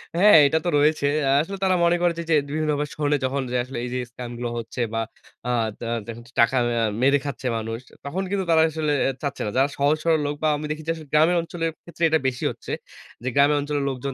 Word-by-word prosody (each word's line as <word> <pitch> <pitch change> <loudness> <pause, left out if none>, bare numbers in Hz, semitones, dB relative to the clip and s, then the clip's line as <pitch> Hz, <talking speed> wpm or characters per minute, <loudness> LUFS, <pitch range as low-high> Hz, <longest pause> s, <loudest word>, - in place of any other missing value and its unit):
হ্যাঁ 200 +1 +7
এটা 160 +3 +1
তো - - +2
রয়েছে। 150 0 +2 0.2
আ - - +2
আসলে 195 +5 -5
তারা 185 -1 +3
মনে 170 0 +4
করে 175 - +3
যে, 170 - -2
যে - - +6
বিভিন্ন 155 +1 -1
বা 150 - 0
শরনে 145 -1 +1
যখন 135 +2 -1
যায় 125 - +1
আসলে 130 -1 -7
এই - - -4
যে - - -1
স্কামগুলো 120 -1 -5
হচ্ছে 115 +2 -5
বা 115 - 0 0.5
আ - - -1 0.3
দা 115 - -5 0.2
দেহেন 115 +1 -8
তো 120 - -19
টাকা 115 +3 +3 0.2
আ - - +2 0.2
মেরে 140 +2 +5
খাচ্ছে 135 -2 -4
মানুষ 115 +1 -4 0.3
তখন 180 +7 -2
কিন্তু 195 -2 -1
তারা 160 - +5
আসলে 155 -1 -1 0.2
এ - - +2
চাচ্ছে 140 -3 -3
না। 105 - -2
যারা 135 +2 +3
সহজ 145 +2 +2
সরল 165 -2 +3
লোক 145 0 -2
বা - - +3
আমি 150 - -5
দেখি 155 +1 -5
যে 165 - +3 0.2
গ্রামের 160 +4 +4
অঞ্চলের 165 -1 -3
ক্ষেত্রে 170 0 -7
এটা 160 - +3
বেশি 125 -2 -3
হচ্ছে। - - -9 0.5
যে - - -4
গ্রামের 145 +1 +4
অঞ্চলের 145 0 -2
লোকজন 135 +1 -4
145 Hz, 240 wpm, -23 LUFS, 130-160 Hz, 0.5 s, হ্যাঁ